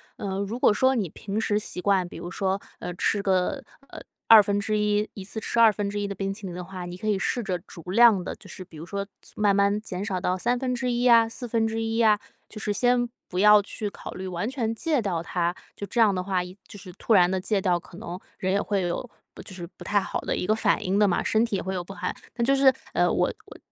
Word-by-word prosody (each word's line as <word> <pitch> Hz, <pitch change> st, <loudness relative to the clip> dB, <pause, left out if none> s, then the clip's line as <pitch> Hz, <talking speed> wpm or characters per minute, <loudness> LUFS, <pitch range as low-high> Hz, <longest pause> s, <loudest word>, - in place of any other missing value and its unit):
呃， 195 Hz, -1 st, -4 dB
如 200 Hz, +4 st, -3 dB
果 245 Hz, -, +4 dB
说 260 Hz, +5 st, +3 dB
你 205 Hz, -8 st, -1 dB
平 200 Hz, +6 st, -4 dB
时 210 Hz, -2 st, +1 dB
习 190 Hz, -3 st, -6 dB
惯， 190 Hz, -2 st, +2 dB
比 -, -, -12 dB
如 175 Hz, -, -7 dB
说， 195 Hz, 0 st, -1 dB, 0.2 s
呃， 180 Hz, -, -5 dB
吃 200 Hz, +3 st, 0 dB
个， 185 Hz, -2 st, +1 dB, 0.3 s
呃， -, -, -9 dB, 0.3 s
1/2， 210 Hz, 0 st, +4 dB
1 195 Hz, -, -7 dB
次 210 Hz, +3 st, -5 dB
吃 230 Hz, -, -2 dB
1/2 205 Hz, -2 st, +3 dB
的 200 Hz, -, -4 dB
冰 195 Hz, 0 st, -3 dB
淇 205 Hz, 0 st, -9 dB
淋 180 Hz, -2 st, -6 dB
的 180 Hz, -, -5 dB
话， 185 Hz, 0 st, -7 dB
你 175 Hz, 0 st, -7 dB
可 200 Hz, +4 st, -6 dB
以 210 Hz, -2 st, +2 dB
试 240 Hz, +5 st, -1 dB
着 190 Hz, -5 st, -2 dB
逐 175 Hz, -1 st, -13 dB
量 220 Hz, -2 st, +6 dB
地， -, -, -5 dB
就 -, -, -14 dB
是 185 Hz, -, -8 dB
比 165 Hz, -3 st, -15 dB
如 160 Hz, -, -8 dB
说 200 Hz, +2 st, -4 dB, 0.3 s
慢 205 Hz, -1 st, +3 dB
慢 200 Hz, +1 st, +2 dB
减 190 Hz, -2 st, -5 dB
少 185 Hz, -3 st, -2 dB
到 180 Hz, +1 st, 0 dB
1/3 245 Hz, +2 st, 0 dB
啊， 230 Hz, -1 st, +6 dB
1/4 225 Hz, -1 st, -1 dB
啊， 215 Hz, -2 st, +4 dB, 0.3 s
就 215 Hz, -, -10 dB
是 210 Hz, -, -2 dB
先 245 Hz, +2 st, +2 dB, 0.2 s
不 180 Hz, -, -3 dB
要 210 Hz, +1 st, +8 dB
去 210 Hz, 0 st, -4 dB
考 -, -, -9 dB
虑 190 Hz, 0 st, -6 dB
完 180 Hz, +3 st, -3 dB
全 235 Hz, -4 st, -2 dB
戒 300 Hz, +1 st, 0 dB
掉 175 Hz, -6 st, -2 dB
它。 175 Hz, 0 st, -1 dB, 0.2 s
就 200 Hz, -, -5 dB
这 240 Hz, -, -2 dB
样 215 Hz, -3 st, +5 dB
的 185 Hz, -1 st, -2 dB
话， 185 Hz, -1 st, 0 dB
一 180 Hz, +1 st, -10 dB
就 -, -, -11 dB
是 185 Hz, -2 st, -11 dB
突 225 Hz, -, 0 dB
然 180 Hz, -2 st, +6 dB
地 190 Hz, 0 st, 0 dB
戒 205 Hz, +2 st, 0 dB
掉， 180 Hz, -2 st, +1 dB
可 170 Hz, -, -14 dB
能 190 Hz, -4 st, -6 dB, 0.2 s
人 190 Hz, 0 st, -1 dB
也 200 Hz, -, +2 dB
会 200 Hz, -2 st, -1 dB
有 175 Hz, +8 st, -3 dB, 0.2 s
不 -, -, -10 dB
就 -, -, -11 dB
是 175 Hz, -2 st, -6 dB
不 -, -, -11 dB
太 205 Hz, 0 st, +2 dB
好 -, -, -3 dB
的 -, -, -2 dB
一 -, -, -2 dB
个 215 Hz, -, +3 dB
反 220 Hz, -, +1 dB
应 190 Hz, +2 st, +1 dB
的 210 Hz, -, +5 dB
嘛， 175 Hz, -, +1 dB
身 220 Hz, +1 st, +2 dB
体 230 Hz, -3 st, -1 dB
也 -, -, -1 dB
会 190 Hz, -, -3 dB
有 180 Hz, -2 st, -3 dB
不 195 Hz, -, -9 dB
害 205 Hz, -, -4 dB, 0.2 s
那 235 Hz, -1 st, 0 dB
就 275 Hz, +2 st, +4 dB
是， 270 Hz, -1 st, +6 dB, 0.2 s
呃， -, -, +3 dB
我 -, -, +2 dB, 0.2 s
我 -, -, -13 dB
205 Hz, 260 characters per minute, -25 LUFS, 185-225 Hz, 0.3 s, 要